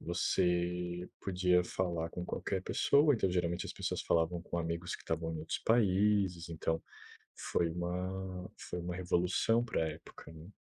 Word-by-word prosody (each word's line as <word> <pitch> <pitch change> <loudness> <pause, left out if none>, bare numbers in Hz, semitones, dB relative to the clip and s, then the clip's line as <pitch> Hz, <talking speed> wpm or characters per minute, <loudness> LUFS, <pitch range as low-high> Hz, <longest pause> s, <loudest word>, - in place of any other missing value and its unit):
você 90 0 0
podia 90 -1 +3
falar 85 -3 -2
com 90 - -5
qualquer 95 +1 -2
pessoa. 145 +6 +4
Então 95 -5 +1
geralmente 85 -1 0
as - - -5
pessoas - - -2
falavam 85 +1 +1
com 85 - -3
amigos 85 +2 -2
que - - -16
estavam 80 0 -2
em - - -4
outros 80 +1 -3
países. 100 -5 +3
Então 80 0 -1 0.5
foi 85 - 0
uma 90 +2 -3
foi 90 - -5
uma 85 0 -4
revolução 90 +6 +2
pra 110 - -1
época, 80 0 -11
né. 80 +1 -11
90 Hz, 155 wpm, -34 LUFS, 85-95 Hz, 0.5 s, pessoa